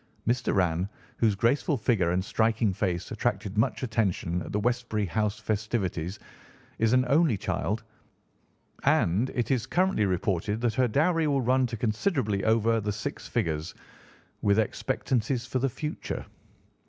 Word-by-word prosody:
Miss 120 Hz, +2 st, +1 dB
Doran, 90 Hz, -3 st, +1 dB, 0.3 s
whose 110 Hz, -3 st, +3 dB
graceful 135 Hz, -, +2 dB
figure 105 Hz, -7 st, +2 dB
and 90 Hz, +2 st, 0 dB
striking 110 Hz, -2 st, +1 dB
face 90 Hz, -4 st, -2 dB
attracted 100 Hz, 0 st, -2 dB
much 125 Hz, +5 st, +1 dB
attention 100 Hz, -7 st, 0 dB
at -, -, -7 dB
the 105 Hz, -, 0 dB
Westbury 120 Hz, -2 st, 0 dB
House 105 Hz, +2 st, -1 dB
festivities, 105 Hz, -5 st, -2 dB, 0.6 s
is 115 Hz, 0 st, +3 dB
an 130 Hz, 0 st, +4 dB
only 145 Hz, -4 st, +3 dB
child, 105 Hz, +4 st, -2 dB, 1.0 s
and 100 Hz, +10 st, +3 dB
it 120 Hz, -1 st, 0 dB
is 125 Hz, -2 st, +1 dB
currently 175 Hz, -, +2 dB
reported 95 Hz, +3 st, 0 dB
that 120 Hz, -2 st, +1 dB
her 130 Hz, +3 st, +2 dB
dowry 160 Hz, +6 st, +2 dB
will 140 Hz, -2 st, +2 dB
run 130 Hz, +1 st, +2 dB
to 115 Hz, -, -5 dB
considerably 110 Hz, -, 0 dB
over 115 Hz, 0 st, +3 dB
the 105 Hz, 0 st, -1 dB
six 110 Hz, +8 st, -5 dB
figures, 80 Hz, -8 st, -2 dB, 0.7 s
with 100 Hz, 0 st, +3 dB
expectancies 120 Hz, +2 st, 0 dB
for 130 Hz, -, -1 dB
the 135 Hz, +2 st, +1 dB
future. 150 Hz, +5 st, -5 dB
110 Hz, 145 wpm, -28 LUFS, 100-125 Hz, 1.0 s, an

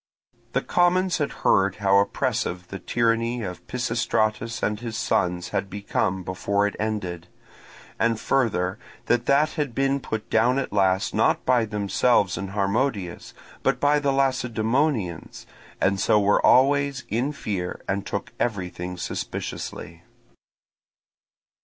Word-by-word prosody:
The -, -, +1 dB
commons 180 Hz, 0 st, +2 dB
had 145 Hz, -, 0 dB
heard 95 Hz, 0 st, +4 dB
how 100 Hz, -1 st, +3 dB
oppressive 90 Hz, -2 st, -1 dB
the 95 Hz, -, -6 dB
tyranny 115 Hz, +3 st, 0 dB
of 90 Hz, -2 st, -7 dB
Pisistratus 115 Hz, -2 st, -1 dB
and 105 Hz, 0 st, 0 dB
his 115 Hz, -2 st, -5 dB
sons 90 Hz, -3 st, 0 dB
had 100 Hz, -1 st, -2 dB
become 95 Hz, -1 st, -2 dB
before 100 Hz, +3 st, 0 dB
it 105 Hz, -, -2 dB
ended, 95 Hz, -5 st, -3 dB, 0.7 s
and 115 Hz, -1 st, +1 dB
further 100 Hz, -10 st, 0 dB, 0.3 s
that 120 Hz, 0 st, +1 dB
that 145 Hz, +3 st, +4 dB
had 145 Hz, -6 st, -3 dB
been 135 Hz, 0 st, +1 dB
put 110 Hz, -3 st, -5 dB
down 120 Hz, +4 st, +3 dB
at 135 Hz, -, -2 dB
last, 95 Hz, -2 st, +2 dB
not -, -, +2 dB
by 125 Hz, -3 st, +3 dB
themselves 105 Hz, 0 st, +1 dB
and 100 Hz, -, -4 dB
Harmodius, 100 Hz, -1 st, -1 dB, 0.3 s
but -, -, +1 dB
by 145 Hz, +1 st, +3 dB
the 140 Hz, -1 st, +1 dB
Lacedaemonians, 125 Hz, -, 0 dB, 0.3 s
and 95 Hz, 0 st, +1 dB
so 105 Hz, -, +4 dB
were 100 Hz, 0 st, +3 dB
always 140 Hz, 0 st, +4 dB
in 120 Hz, +7 st, 0 dB
fear 95 Hz, -10 st, -4 dB
and 100 Hz, 0 st, -1 dB
took -, -, -5 dB
everything 90 Hz, -5 st, -3 dB
suspiciously. 85 Hz, -1 st, -5 dB
110 Hz, 130 wpm, -24 LUFS, 95-125 Hz, 0.7 s, heard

